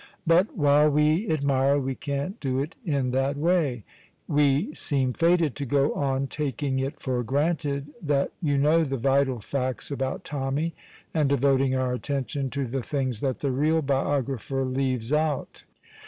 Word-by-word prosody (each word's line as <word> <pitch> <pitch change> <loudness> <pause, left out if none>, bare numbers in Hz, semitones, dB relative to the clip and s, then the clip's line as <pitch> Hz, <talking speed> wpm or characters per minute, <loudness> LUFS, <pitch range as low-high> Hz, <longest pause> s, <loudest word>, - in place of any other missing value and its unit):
But 175 +6 +3
while 145 0 +5
we 150 +7 +2
admire, 140 -2 +2
we 135 -1 -1
can't 140 - -4
do 130 -2 -1
it 145 +4 -2
in 140 - 0
that 135 +2 0
way. 150 - +1 0.4
We 145 - +2
seem 130 -3 0
fated 165 -3 +2
to 140 - -3
go 140 +3 +2
on 135 -1 0
taking 135 -1 -2
it 135 +1 -3
for 125 -2 -1
granted 145 +2 -1
that 145 -3 0
you 145 -4 +1
know 155 +4 +4
the 135 -3 -2
"vital 135 0 +2
facts" 130 +2 -3
about 135 -1 -3
Tommy, 145 +3 -2 0.4
and 150 -4 +2
devoting 135 -1 +2
our 130 -1 0
attention 135 +1 -2
to 140 +1 -2
the 130 +2 -3
things 130 -4 -2
that 130 -3 -2
the 140 - 0
real 155 +5 +1
biographer 135 -1 -1
leaves 130 -1 -1
out. 150 -2 -1
140 Hz, 155 wpm, -26 LUFS, 130-150 Hz, 0.4 s, while